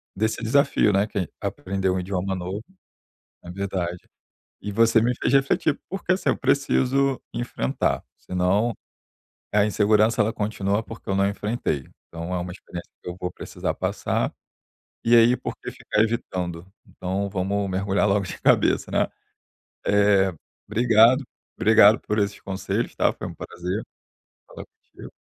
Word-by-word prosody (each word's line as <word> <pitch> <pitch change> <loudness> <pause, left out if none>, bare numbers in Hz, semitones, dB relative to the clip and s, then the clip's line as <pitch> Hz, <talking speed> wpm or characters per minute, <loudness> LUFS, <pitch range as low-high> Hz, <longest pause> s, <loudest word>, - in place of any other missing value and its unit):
desse 110 +3 -1
desafio, 120 -2 +3
né, 100 +1 +2
que 105 - -3
é 90 - -1
aprender 95 0 -2
um 95 - +1
idioma 95 +1 -2
novo 95 +4 -5 0.8
é 85 - -10
verdade. 90 -2 -4 0.5
E 105 - -5
você 115 +2 +4
me 120 +3 +2
fez - - 0
refletir, 140 +2 +2
porque 190 -1 -1
assim, 185 - +1
eu - - 0
preciso 135 0 +2
enfrentar, 65 - -1
senão 95 +6 0 0.8
a 105 0 +4
insegurança 110 +2 +3
ela 110 +2 0
continua 105 -1 -1
porque 115 +1 -11
eu - - +1
não 100 0 +3
enfrentei. 100 - -2 0.2
Então 85 +2 -6
é - - 0
uma 90 0 -4
experiência 90 -2 -9
que - - -7
eu 90 - -5
vou 90 - -2
precisar - - -4
passar, - - -1 0.7
e 120 +1 +5
aí 115 +2 +6
por 125 - -6
que - - -7
ficar 105 - -1
evitando? 90 -7 -3 0.2
Então 95 +2 -3
vamos 100 +2 -1
mergulhar 95 +2 +1
logo 100 -1 +2
de - - -7
cabeça, - - +3
né? - - +2 0.8
Eh, 100 -2 +4 0.3
obrigado, 115 +4 +5 0.3
obrigado 110 0 +6
por 105 - -2
esses 100 0 -1
conselhos, 95 -1 -3
tá? - - +2
Foi - - -6
um - - -8
prazer, 90 +5 -4 0.7
falar - - -9
contigo. - - -15
100 Hz, 150 wpm, -24 LUFS, 95-115 Hz, 0.8 s, aí